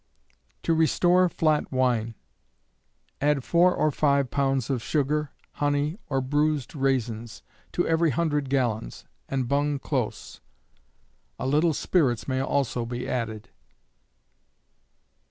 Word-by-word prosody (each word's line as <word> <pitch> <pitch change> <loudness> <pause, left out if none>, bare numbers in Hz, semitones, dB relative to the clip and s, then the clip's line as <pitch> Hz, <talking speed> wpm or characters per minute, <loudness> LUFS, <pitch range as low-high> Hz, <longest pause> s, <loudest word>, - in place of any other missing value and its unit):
To 165 - +2
restore 175 +3 +3
Flat 155 -3 +1
Wine. 120 -4 0 1.1
Add 145 -2 +2
four 175 +4 +3
or 155 - +2
five 140 -2 +1
pounds 135 -3 0
of 125 -3 -1
sugar, 150 +2 0 0.2
honey, 145 +5 -1
or 135 -2 0
bruised 145 +1 0
raisins, 120 -5 -2 0.3
to 175 - 0
every 165 0 +3
hundred 145 -1 0
gallons, 120 - -1 0.2
and 130 -2 -1
bung 145 +2 +1
close. 130 -5 -4 1.0
A - - -4
little 150 +4 +2
spirits 135 -11 +1
may 130 -1 0
also 135 -3 0
be 120 +1 -5
added. 115 -2 -3
140 Hz, 115 wpm, -26 LUFS, 125-150 Hz, 1.1 s, restore